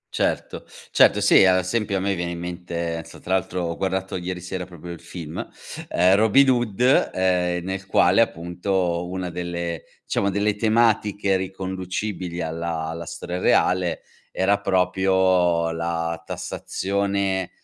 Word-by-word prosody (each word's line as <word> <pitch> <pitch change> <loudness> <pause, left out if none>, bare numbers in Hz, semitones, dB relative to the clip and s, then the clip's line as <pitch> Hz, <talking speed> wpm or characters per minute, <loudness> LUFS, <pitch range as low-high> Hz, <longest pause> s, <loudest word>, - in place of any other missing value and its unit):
Certo, - - -1 0.3
certo, - - +5
sì, - - +6
a 95 -1 +5
esempio 100 +2 -1
a - - 0
me 100 +1 0
viene 85 -1 -3
in 85 - -5
mente, 85 -1 -4
non 80 0 -4
so - - -13
tra 95 - -3
l'altro 95 -1 -1
ho 85 -1 -2
guardato 95 0 -2
ieri 90 0 -4
sera 90 +1 -5
proprio 85 -1 -10
il 85 - -8
film, 80 -3 -6 0.4
ehm, 90 +2 +4
Robin 110 +6 +5
Hood, 120 +1 +2
ehm, 90 -2 +1
nel 95 0 -4
quale 95 +2 +4
appunto 90 -2 -1
una 90 -1 -4
delle 85 -2 -4 0.2
diciamo 100 - 0
delle 100 +1 0
tematiche 105 -3 +2
riconducibili 95 -1 -4
alla 80 0 -3
alla 85 0 -6
storia 85 +2 -5
reale, 90 -1 +2 0.3
era 100 +2 +2
proprio 95 -3 +2
la 85 0 -2
tassazione, 100 0 -2
90 Hz, 145 wpm, -23 LUFS, 85-95 Hz, 0.4 s, sì